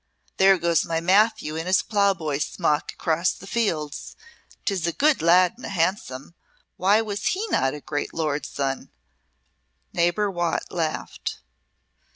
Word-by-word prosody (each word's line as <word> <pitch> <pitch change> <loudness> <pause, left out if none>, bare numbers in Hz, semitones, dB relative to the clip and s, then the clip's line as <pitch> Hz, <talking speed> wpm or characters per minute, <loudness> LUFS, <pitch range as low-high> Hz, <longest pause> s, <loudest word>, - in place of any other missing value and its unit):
There 190 0 +6
goes 170 -2 +2
my 165 -1 -1
Matthew 195 -1 +2
in 165 +2 -4
his 185 +1 +3
ploughboy's 180 -9 +1
smock 160 -3 -1
across 165 +3 0
the - - -12
fields. 165 -10 -2 0.5
'Tis 190 -5 0
a - - +1
good 300 0 +2
lad 175 +2 +5
and 250 - -9
a - - -6
handsome. 165 -6 -2 0.4
Why 205 +4 +3
was 205 -2 -4
he 395 +4 0
not 135 +2 +1
a 150 - -9
great 145 0 -3
lord's 150 -3 -2
son?" 135 -1 -3 1.0
Neighbour 175 +4 +1
Watt 175 -2 -1
laughed. 160 -3 -3
170 Hz, 145 wpm, -24 LUFS, 155-200 Hz, 1.0 s, There